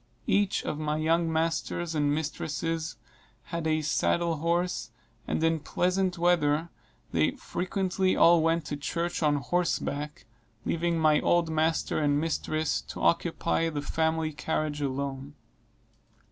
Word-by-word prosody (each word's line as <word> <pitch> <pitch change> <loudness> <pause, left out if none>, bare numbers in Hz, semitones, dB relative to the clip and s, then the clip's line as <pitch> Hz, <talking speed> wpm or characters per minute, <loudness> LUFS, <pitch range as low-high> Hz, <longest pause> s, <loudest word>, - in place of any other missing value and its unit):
Each 200 -1 +2
of 150 - -3
my 150 0 -1
young 165 +1 +2
masters 165 +1 -1
and 145 -2 +1
mistresses 160 +2 -2 0.5
had 170 -1 -3
a 155 0 +1
saddle 170 +2 +1
horse, 170 +2 0 0.4
and - - -1
in 165 0 +2
pleasant 185 +3 0
weather 165 -2 +2 0.4
they - - +2
frequently 185 0 -1
all 170 0 +6
went 165 0 +1
to 145 0 -4
church 170 +5 -2
on 150 -2 +3
horseback, 150 -1 -2 0.4
leaving 170 0 0
my 155 -2 +4
old 170 -2 +2
master 160 +1 +1
and 145 -1 +2
mistress 155 -1 -1
to - - -7
occupy 170 -1 +1
the 145 -2 -4
family 160 +1 0
carriage 150 0 -2
alone. 140 +1 -3
160 Hz, 130 wpm, -28 LUFS, 150-170 Hz, 0.5 s, all